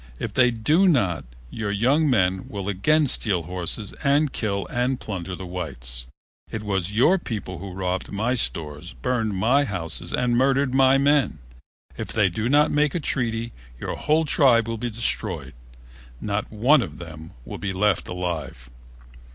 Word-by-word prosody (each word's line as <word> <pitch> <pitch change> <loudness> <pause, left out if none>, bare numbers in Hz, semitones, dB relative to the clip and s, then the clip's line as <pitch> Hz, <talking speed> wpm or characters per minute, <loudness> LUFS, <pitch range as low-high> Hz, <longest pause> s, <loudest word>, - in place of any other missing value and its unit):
If - - -5
they 125 -1 +4
do 150 - +2
not 100 - +2 0.3
your 110 -2 -3
young 130 +10 +2
men 95 -6 +1
will 100 -2 -5
again 150 +11 +2
steal 100 -9 +3
horses 90 +4 -2
and 145 +1 +2
kill 100 -3 -2
and 125 +1 0
plunder 95 -3 -5
the 95 - -8
whites. 60 -9 -3 0.4
It 110 - -5
was 95 -2 -1
your 140 - +4
people 100 - -5
who 95 +1 -7
robbed 95 0 -3
my 110 +5 0
stores, 80 - -2
burned 115 -5 -1
my 125 +9 +3
houses 90 - -2
and 125 -1 +1
murdered 135 +1 +2
my 135 0 +5
men. 140 - +2 0.6
It - - -3
they 105 -4 +2
do 110 +6 -2
not 145 +2 +4
make 150 0 +1
a - - +1
treaty, 115 -5 -2 0.3
your - - -4
whole 155 +2 +1
tribe 125 -6 +4
will 115 -1 -3
be 120 +1 -2
destroyed. 115 - -2 0.7
Not 105 0 -3
one 125 +7 +4
of - - -6
them 80 -1 -10
will - - -7
be 100 - -2
left 95 0 +1
alive." 80 -9 -5
110 Hz, 165 wpm, -24 LUFS, 90-130 Hz, 0.7 s, my